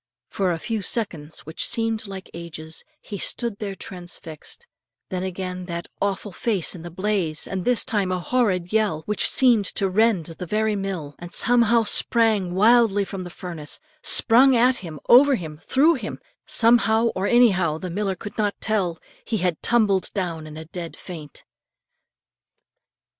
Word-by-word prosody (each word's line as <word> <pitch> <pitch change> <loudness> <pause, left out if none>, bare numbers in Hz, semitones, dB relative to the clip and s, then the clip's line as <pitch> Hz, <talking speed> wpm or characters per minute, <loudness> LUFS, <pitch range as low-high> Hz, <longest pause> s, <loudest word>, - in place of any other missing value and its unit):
For 190 -2 0
a 170 - -1
few 220 +6 -3
seconds 170 -8 -2
which 160 +2 -4
seemed 225 -2 -2
like 195 -1 -9
ages, 160 -1 -8 0.2
he 200 -3 -7
stood 235 0 -2
there 200 -2 -4
transfixed; 175 - -8 0.4
then 185 -2 -3
again 185 -1 -5
that 170 -1 -5
awful 200 +1 -2
face 195 -1 0
in 175 - -9
the 175 - -7
blaze, 180 -3 -1
and 190 -1 -4
this 245 +1 +3
time 200 -4 0
a 185 - -1
horrid 185 -4 0
yell 210 -8 +1
which 210 - +1
seemed 240 -6 +4
to 195 - 0
rend 200 -2 +2
the 170 +2 -6
very 215 +2 0
mill; 190 -7 -4
and 175 0 -5
something 235 -1 +3
sprang 215 -6 +2
wildly 215 -1 +4
from 190 -1 -6
the 175 - -7
furnace, 170 -4 -6 0.2
sprung 255 +3 +5
at 250 +2 +4
him, 160 -5 -8
over 270 +3 +7
him, 155 -7 -7
through 300 +6 +4
him, 240 -9 -5 0.3
somehow 230 0 +4
or 195 -2 -2
anyhow, 190 -10 +3
the 180 +2 -6
miller 195 +1 -1
could 205 +2 -9
not 205 -1 0
tell, 195 -6 0 0.3
he 225 - -2
had 180 -4 -1
tumbled 210 -6 +2
down 170 -5 -3
in 155 0 -10
a 160 - -8
dead 170 0 -7
faint. 155 -6 -10
195 Hz, 165 wpm, -23 LUFS, 175-225 Hz, 0.4 s, over